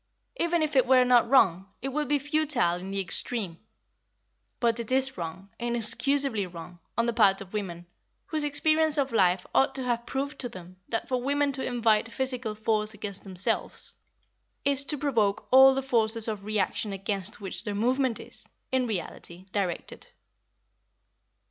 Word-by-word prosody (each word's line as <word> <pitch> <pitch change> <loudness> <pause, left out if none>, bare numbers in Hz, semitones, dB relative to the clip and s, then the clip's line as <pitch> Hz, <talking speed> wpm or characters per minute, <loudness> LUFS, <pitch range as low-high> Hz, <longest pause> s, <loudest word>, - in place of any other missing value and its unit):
Even 340 -1 +1
if 305 -2 -2
it 255 -2 +4
were 255 -1 +5
not 245 -2 +4
wrong, 190 -8 +4 0.2
it 270 - -1
would 300 +2 -2
be 290 +2 +2
futile 290 - +1
in 185 +2 -8
the 195 0 -2
extreme. 195 -1 -1 1.0
But 235 -1 +1
it 235 +1 -4
is 265 0 +4
wrong, 180 +3 -7
inexcusably 240 0 +2
wrong, 175 0 -11 0.2
on 230 - +2
the 235 - 0
part 200 -4 +4
of 195 0 -10
women, 175 -5 -5 0.4
whose 310 -2 -2
experience 310 +1 +2
of 275 -2 0
life 185 -4 +2
ought 270 0 +2
to 265 - -3
have 240 -1 -2
proved 280 +2 -4
to 245 - -3
them 185 -2 -12
that 225 - -2
for 255 -1 -1
women 285 +2 +1
to 265 -1 -5
invite 225 -2 +1
physical 255 -4 -3
force 215 0 -1
against 200 -2 -6
themselves 185 -2 0 0.7
is 280 0 +5
to 295 - +1
provoke 220 -8 0
all 265 +1 +8
the 270 - -1
forces 230 -3 +2
of 210 -3 -4
reaction 210 0 -1
against 195 +2 -4
which 190 -2 -4
their 210 -3 -4
movement 250 +2 0
is, - - -7 0.2
in 260 -1 +1
reality, 180 -2 -5
directed. 185 -4 -4
230 Hz, 165 wpm, -27 LUFS, 200-270 Hz, 1.0 s, all